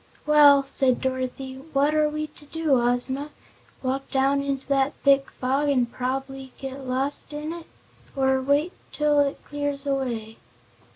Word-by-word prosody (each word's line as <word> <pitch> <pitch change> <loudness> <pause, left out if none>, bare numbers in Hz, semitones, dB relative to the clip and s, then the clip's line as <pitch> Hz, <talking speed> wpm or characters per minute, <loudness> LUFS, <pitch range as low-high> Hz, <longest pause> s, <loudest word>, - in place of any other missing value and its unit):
"Well," 290 -2 +7
said 265 -2 +1
Dorothy, 260 0 -3 0.2
"what 285 +2 +3
are 305 -1 +3
we 305 0 -3
to 300 - -14
do, 305 -5 +1
Ozma? 255 +4 +1 0.5
Walk 265 +1 -2
down 275 +1 +2
into 275 -1 -3
that 275 0 +1
thick 275 -1 +3
fog, 270 +3 -1
an' 255 -3 +3
prob'bly 265 +2 -5
get 270 0 -7
lost 270 +3 -2
in 300 +2 -4
it, 340 -1 -9 0.5
or 265 -1 +2
wait 285 +6 +1 0.2
till 300 -1 +2
it 285 -1 0
clears 285 -1 -4
away?" 240 -6 -2
275 Hz, 150 wpm, -25 LUFS, 265-290 Hz, 0.5 s, Well